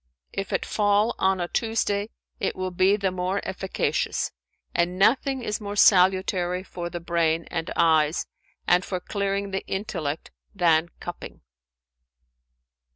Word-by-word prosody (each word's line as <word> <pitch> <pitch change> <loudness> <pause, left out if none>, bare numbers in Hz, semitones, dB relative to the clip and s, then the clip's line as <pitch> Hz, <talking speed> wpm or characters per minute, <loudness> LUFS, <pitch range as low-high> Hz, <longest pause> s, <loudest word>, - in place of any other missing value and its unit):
If 195 - -4
it - - 0
fall 210 +2 +2
on 190 0 +2
a 175 - -1
Tuesday, 215 -1 -1 0.3
it - - -1
will 185 0 -3
be 185 +3 +4
the 195 -2 0
more 185 +2 -1
efficacious, 190 0 -1 0.4
and 175 +1 +1
nothing 255 +6 +2
is 210 0 -2
more 205 0 -5
salutary 185 -2 +4
for 175 -2 -6
the 175 - -5
brain 165 -1 0
and 165 -1 -3
eyes 160 -1 +3 0.4
and 180 +1 +4
for 185 0 -3
clearing 200 +1 -2
the 195 - -2
intellect 165 -7 -3 0.2
than 170 -3 +3
cupping." 175 0 -8
185 Hz, 135 wpm, -25 LUFS, 175-200 Hz, 0.4 s, be